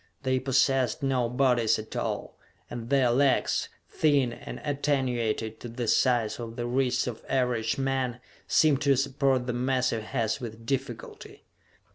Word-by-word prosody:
They 130 Hz, -1 st, +1 dB
possessed 135 Hz, +1 st, +1 dB
no 130 Hz, -3 st, +1 dB
bodies 125 Hz, -3 st, +2 dB
at 110 Hz, 0 st, -8 dB
all, -, -, -3 dB, 0.4 s
and 115 Hz, -1 st, -6 dB
their 135 Hz, -3 st, +3 dB
legs, 135 Hz, +2 st, +2 dB, 0.2 s
thin 140 Hz, -6 st, +2 dB
and -, -, -8 dB
attenuated 125 Hz, -6 st, -1 dB
to 120 Hz, -, -7 dB
the 120 Hz, 0 st, -4 dB
size 120 Hz, -3 st, +2 dB
of 115 Hz, -1 st, -6 dB
the 120 Hz, -1 st, -3 dB
wrists 125 Hz, +1 st, +1 dB
of 120 Hz, -3 st, -6 dB
average 125 Hz, -4 st, 0 dB
men, 135 Hz, -2 st, -1 dB, 0.3 s
seemed 150 Hz, -3 st, +3 dB
to 140 Hz, -2 st, +4 dB
support 135 Hz, -1 st, +1 dB
the 125 Hz, -, -2 dB
massive 125 Hz, -2 st, 0 dB
heads 115 Hz, +2 st, -2 dB
with 115 Hz, -1 st, -8 dB
difficulty! 125 Hz, -3 st, -5 dB
125 Hz, 145 wpm, -27 LUFS, 120-135 Hz, 0.4 s, to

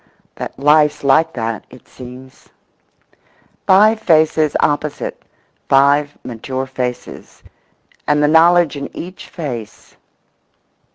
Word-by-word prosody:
That -, -, -8 dB
life's 150 Hz, +1 st, +3 dB
like 155 Hz, +4 st, +3 dB
that, 115 Hz, -3 st, -4 dB
it -, -, -17 dB
seems. 130 Hz, +1 st, -13 dB, 1.2 s
Five 215 Hz, +4 st, +5 dB
faces 155 Hz, -5 st, +2 dB
opposite—five 145 Hz, -1 st, -1 dB
mature 130 Hz, +3 st, -5 dB
faces—and 130 Hz, +3 st, -6 dB
the -, -, +4 dB
knowledge 165 Hz, 0 st, +4 dB
in 140 Hz, 0 st, -6 dB
each 180 Hz, +2 st, -9 dB
face. 125 Hz, -, -8 dB
145 Hz, 90 wpm, -17 LUFS, 130-160 Hz, 1.2 s, Five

